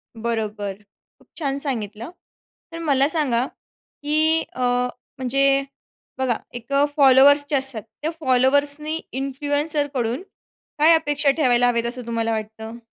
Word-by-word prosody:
बरोबर. 220 -3 -3 0.5
खूप - - -25
छान 275 -4 -2
सांगितलं. 230 -4 -3 0.6
तर 330 - -7
मला 280 -4 +2
सांगा, 265 -7 +1 0.4
की 310 +2 0
अ, 255 - -6 0.6
म्हणजे 275 +1 +2 0.5
बघा, 260 -3 0 0.2
एक 240 +3 -7 0.2
फॉलोवर्स 280 +1 +6
जे 295 - +1
असतात 265 -4 0 0.2
त्या 310 +2 -1
फॉलोवर्सनी 285 +3 +2
इन्फ्लुएन्सर 285 +3 -1
कडून 245 +1 -1 0.6
काय 315 +3 +6
अपेक्षा 295 -2 +1
ठेवायला 245 -5 +3
हवेत 235 -1 0
असं 245 0 -5
तुम्हाला 230 -1 -1
वाटतं? 220 +1 -5
270 Hz, 120 wpm, -22 LUFS, 235-290 Hz, 0.6 s, फॉलोवर्स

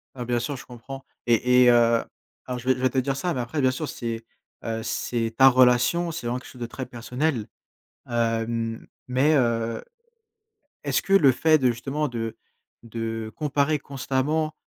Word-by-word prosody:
Ah 125 - -5
bien 120 0 0
sûr, 135 +4 -3
je - - -11
comprends 130 +2 -9 0.2
et 125 +2 +4
et 125 - +7
heu, 115 -1 +4 0.4
alors 125 -1 -3
je 125 +1 -7
vais 130 - +5
je 125 - -8
vais 130 0 +2
te 130 - -2
dire 135 +1 +1
ça 175 +6 -1
mais 130 - -2
après 125 +5 -3
bien 130 -1 +4
sûr 145 +4 -4
c'est, 115 -2 -5 0.4
heu, 115 0 -3
c'est 115 0 -2
ta 135 - +7
relation, 130 +7 +4
c'est 135 -7 -5
vraiment 120 +1 -1
quelque - - -13
chose 125 - -14
de 120 - -2
très 130 +3 -6
personnel. 125 +1 -2 0.6
Hem, 115 -1 -1 0.2
mais 130 +5 +3
heu, 115 -3 0 1.0
est-ce - - +1
que - - -7
le 150 -9 +7
fait 155 +5 +4
de 130 -4 +2
justement 140 +6 -2
de 115 -3 -4 0.5
de 115 -1 -5
comparer 150 0 +1
constamment, 140 +3 -1
125 Hz, 185 wpm, -25 LUFS, 115-135 Hz, 1.0 s, et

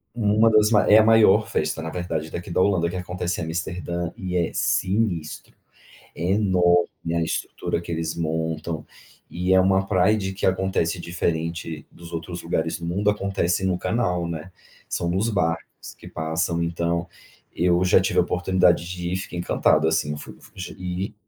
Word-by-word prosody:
uma 110 0 +3
das 105 0 +5
ma 105 -2 +5
é 105 - +8
a 110 - +6
maior 110 -1 +5
festa, 80 - -1
na 80 - -4
verdade, 80 -3 -3
daqui 85 - -6
da 90 - +2
Holanda, 90 -4 +2
que 90 - -6
acontece 90 -1 -3
em 80 - -3
Amsterdã 85 +1 -3
e 90 -2 -5
é 85 - 0
sinistro, 90 -5 -1 0.6
é 85 +3 -1
enorme 90 -4 +2
a 85 - +1
estrutura 80 +1 -2
que 85 - -6
eles 80 0 -2
montam 80 -1 -2 0.5
e 90 +2 0
é 95 - +6
uma 95 +1 +2
Pride 95 +1 +2
que 95 - -2
acontece 95 -2 0
diferente 85 -2 -3
dos 85 0 -12
outros 85 +2 -5
lugares 80 -1 -1
do 85 - -5
mundo, 100 +5 +1
acontece 95 -3 -1
no 95 -1 +1
canal, 90 -8 0
né, 85 +2 -6 0.4
são 85 - -2
nos 95 +6 0
barcos 85 -6 -2
que - - -11
passam. 80 +2 -1
Então, 85 +1 -1 0.5
eu 90 +1 +3
já 90 - +5
tive - - 0
a - - +7
oportunidade 90 -1 +2
de 90 -1 -4
ir, - - 0
fiquei 95 -2 -6
encantado, 85 -2 +2
assim, 80 -2 0
eu - - -4
fui - - -10
fui - - -17 0.3
e 90 +2 -4
90 Hz, 175 wpm, -24 LUFS, 85-95 Hz, 0.6 s, é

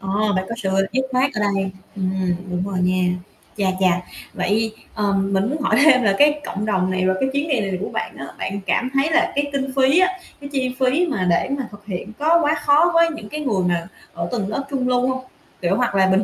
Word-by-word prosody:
Ờ, 205 +2 0
bạn 185 0 0
có 230 - -3
sự 195 -5 -2 0.2
dứt 260 +1 0
khoát 260 +2 +2
ở - - -3
đây, 195 -2 0 0.2
ừm, 185 -2 -1
đúng 180 0 -2
rồi 190 -2 -2
nha, 185 0 +2 0.5
chà 200 - 0
chà. 180 -2 +3 0.3
Vậy, 220 +2 0 0.2
ờ, 205 -2 0
mình 195 +2 +1
muốn 295 +1 -3
hỏi - - +2
thêm 255 -5 +6
là 200 -2 +3
cái 295 0 +4
cộng 205 +2 -3
đồng 185 -3 +1
này, 185 0 0
rồi 185 0 +2
cái 265 - +1
chuyến 285 +3 -1
đi 265 -5 +2
này 195 -2 -2
của - - -3
bạn - - -4
á, 140 - -6
bạn 200 +1 -3
cảm 250 +6 +1
thấy 275 +4 +2
là 325 - +3
cái 285 +1 +1
kinh 270 -1 -1
phí 270 +5 +4
á, 370 - +5 0.3
cái 280 - -7
chi 255 -2 -1
phí 270 +7 +2
mà 190 - -1
để 170 +9 +2
mà 265 -3 -4
thực 205 0 -14
hiện 195 +1 -5
có 325 +3 +4
quá 300 0 +2
khó 305 +5 +5
với 335 0 +5
những 210 -1 -9
cái 305 - -5
người 215 -10 0
mà 175 -1 -1 0.3
ở 170 0 -3
tầng 215 -5 -1
lớp 215 +7 -2
trung 260 -3 -1
lưu 250 0 +2
hông? 260 0 -2 0.4
Kiểu, 180 +2 +1
hoặc 245 -4 0
là 190 -1 +4
bình 190 +2 +3
215 Hz, 250 wpm, -21 LUFS, 190-275 Hz, 0.5 s, thêm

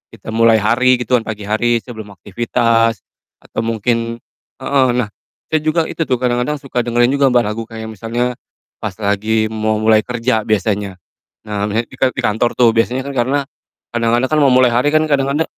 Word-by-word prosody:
kita 110 +1 -9
mulai 115 0 +4
hari 120 +4 +3
gitu 125 +1 +1
kan, - - -9
pagi 105 -2 -5
hari 115 +3 0
sebelum 110 -4 -10
aktivitas, 115 +2 0 0.4
atau - - -4
mungkin 115 +1 -1 0.5
heeh. 135 -1 +2
Nah 125 -3 0 0.4
saya 155 - +2
juga 155 +2 +1
itu - - -6
tuh 130 - +2
kadang-kadang 125 +3 0
suka 130 -2 -3
dengerin 120 +1 +2
juga, 140 0 +3
Mbak, 120 -1 +3
lagu 105 +2 -3
kayak 110 -1 -7
misalnya 120 +3 -2 0.5
pas 105 -3 -5
lagi 110 +2 0
mau 110 0 0
mulai 110 0 +5
kerja 115 -1 -1
biasanya. 100 -2 0 0.5
Nah 105 -1 -3
misalnya 110 +3 -1
di 130 - -13
ka 130 - +4
di 130 - -3
kantor 115 +2 0
tuh 120 -2 +5
biasanya 120 +3 0
kan 140 - -6
karena 130 +3 +1 0.5
kadang-kadang 120 +2 +1
kan 155 - +3
mau 145 - +4
mulai 125 -1 +5
hari 125 +5 +2
kan 155 - +4
kadang-kadang 140 +2 +1
115 Hz, 185 wpm, -17 LUFS, 110-125 Hz, 0.5 s, mulai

